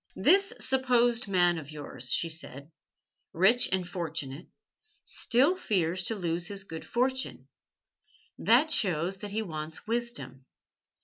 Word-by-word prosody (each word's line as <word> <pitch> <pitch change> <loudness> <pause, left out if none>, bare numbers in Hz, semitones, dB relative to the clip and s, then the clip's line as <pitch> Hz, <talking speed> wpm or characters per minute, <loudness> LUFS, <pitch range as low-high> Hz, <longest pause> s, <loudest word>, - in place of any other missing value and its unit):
"This 390 +1 +4
supposed 245 -3 +2
man 175 -3 +2
of 145 -3 -11
yours," 130 -5 -4
she 170 - +2
said, 155 -2 -5 0.6
"rich 215 +9 +4
and 185 -2 0
fortunate, 165 -4 -5 0.6
still 270 +9 +2
fears 185 - -1
to 225 - -1
lose 175 -2 -2
his 200 -1 -4
good 165 -4 -8
fortune. 260 +2 -1 0.9
That 265 +8 +4
shows 180 - +2
that 205 +2 -7
he 220 +2 -2
wants 155 -3 -6
wisdom. 230 - -4
190 Hz, 125 wpm, -29 LUFS, 160-240 Hz, 0.9 s, This